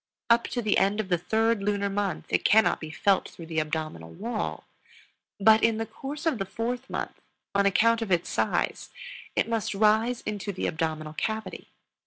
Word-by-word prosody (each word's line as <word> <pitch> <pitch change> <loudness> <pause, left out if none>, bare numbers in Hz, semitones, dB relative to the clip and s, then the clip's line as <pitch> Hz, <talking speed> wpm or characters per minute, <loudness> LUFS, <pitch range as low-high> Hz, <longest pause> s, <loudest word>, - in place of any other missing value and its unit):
Up 235 0 +5
to 240 - -3
the 215 - +3
end 200 +2 +2
of 205 -3 -2
the 175 - +3
third 225 +3 +1
lunar 200 0 0
month 200 -1 -2
it - - +1
cannot 220 +1 +4
be 155 - -6
felt 195 +5 +1
through 165 - -11
the 160 -1 -1
abdominal 155 - -3
wall; 215 - -4 0.8
but 220 +2 +6
in 225 -1 +3
the 225 - -2
course 285 +6 -7
of 305 -9 +1
the 195 - -1
fourth 240 +6 -4
month, - - -5 0.3
on 200 0 +3
account 230 +4 +3
of 220 -4 -3
its 175 -1 +2
size, - - -1 0.5
it - - +2
must 225 -2 -1
rise 220 +4 +3
into 205 -1 -4
the 185 - -4
abdominal 155 -1 -2
cavity. 220 +6 -4
210 Hz, 185 wpm, -27 LUFS, 185-225 Hz, 0.8 s, but